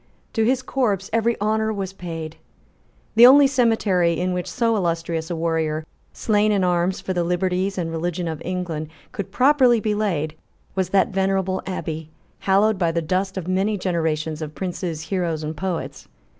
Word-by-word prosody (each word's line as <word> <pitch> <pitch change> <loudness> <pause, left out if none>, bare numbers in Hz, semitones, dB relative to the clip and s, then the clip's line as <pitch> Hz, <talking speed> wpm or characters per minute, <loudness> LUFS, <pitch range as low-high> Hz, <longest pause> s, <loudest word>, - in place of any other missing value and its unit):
To 225 - +1
his 255 +3 +1
corpse 210 -8 -1
every 230 +1 +1
honour 220 +1 +1
was 195 -3 -4
paid. 165 -4 -6 0.8
The 235 +2 +9
only 280 +2 +8
cemetery 220 -10 +2
in 180 +1 0
which 180 -1 -3
so 230 -2 +1
illustrious 165 -3 -1
a 175 - -2
warrior, 160 -1 -1 0.3
slain 210 -1 +1
in 200 -2 +2
arms 180 +1 +1
for 190 - -3
the 175 -1 0
liberties 185 +2 0
and 165 -2 -2
religion 170 +1 -2
of 160 -2 -4
England, 175 -4 -3 0.2
could 200 - -5
properly 255 -3 +4
be 215 -1 0
laid 175 -8 -1 0.4
was 190 -2 -1
that 195 0 +3
venerable 190 -1 0
Abbey, 160 -4 -4 0.3
hallowed 200 +1 +2
by 170 -3 +2
the 165 0 -1
dust 190 +4 -1
of 180 -2 -4
many 195 +3 +1
generations 160 -4 -1
of 155 -1 -6
princes, 175 -3 -4
heroes 170 -3 -2
and 155 +1 -4
poets. 180 +1 -4
185 Hz, 170 wpm, -22 LUFS, 165-210 Hz, 0.8 s, The